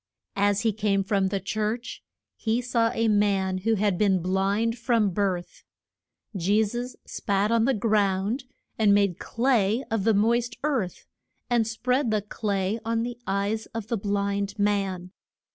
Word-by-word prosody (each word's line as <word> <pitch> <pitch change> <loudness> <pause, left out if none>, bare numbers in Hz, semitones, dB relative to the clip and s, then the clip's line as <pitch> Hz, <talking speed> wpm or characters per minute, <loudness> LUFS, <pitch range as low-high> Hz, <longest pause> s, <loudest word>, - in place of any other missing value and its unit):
As 205 0 +2
he 225 -2 +1
came 200 -2 +1
from 195 -1 +1
the 195 +1 -1
church 215 +4 -3 0.3
he 225 +1 0
saw 235 -2 +1
a 230 -1 0
man 200 -3 +2
who 225 +4 +1
had 200 -3 0
been 195 -3 +3
blind 195 +5 0
from 230 -3 +1
his - - -7
birth. 185 -3 -2 0.7
Je 200 +4 +2
sus 240 +4 -4
spat 200 +1 -1
on 230 -1 +3
the 270 - +3
ground 210 +3 +1 0.3
and 205 -2 +5
made 200 -4 +2
clay 235 -2 +1
of 225 -3 0
the 220 0 +3
moist 235 +3 +1
earth, 260 -12 -1 0.5
and 235 -2 +3
spread 250 +3 0
the 215 -2 0
clay 205 0 -2
on 230 0 0
the 240 0 -5
eyes 200 +3 -1
of 220 -1 -6
the 235 - 0
blind 200 0 -1
man. 195 -3 -1
210 Hz, 160 wpm, -26 LUFS, 195-230 Hz, 0.7 s, and